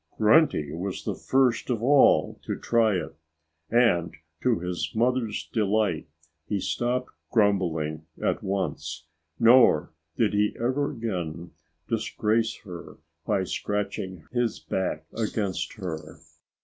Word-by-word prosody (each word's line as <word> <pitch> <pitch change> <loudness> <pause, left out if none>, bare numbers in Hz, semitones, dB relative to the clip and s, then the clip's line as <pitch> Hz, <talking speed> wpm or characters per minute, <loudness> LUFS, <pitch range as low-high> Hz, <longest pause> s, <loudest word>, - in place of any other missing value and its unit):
Grunty 110 - +4
was 90 +3 -4
the - - -2
first 130 -3 +1
of 115 -3 -1
all 140 +2 +4
to - - -2
try 115 -3 +2
it. 80 -3 -4 0.5
And 110 -9 +3 0.3
to 125 -3 +2
his 90 0 -3
mother's 120 -1 0
delight, 105 -6 +1 0.4
he 105 - -1
stopped 125 +6 -1 0.2
grumbling 80 -8 +1
at - - 0
once. 85 -5 -3 0.3
Nor 115 -10 +6 0.2
did 110 -3 +2
he 105 0 +1
ever 130 +5 0
again 90 - -4 0.4
disgrace 110 +1 0
her 90 -4 -9 0.3
by - - +2
scratching 100 -4 -3
his 120 -2 0
back 85 -5 -2
against 105 -3 -2
her. 80 -6 -6
105 Hz, 115 wpm, -26 LUFS, 90-115 Hz, 0.5 s, Nor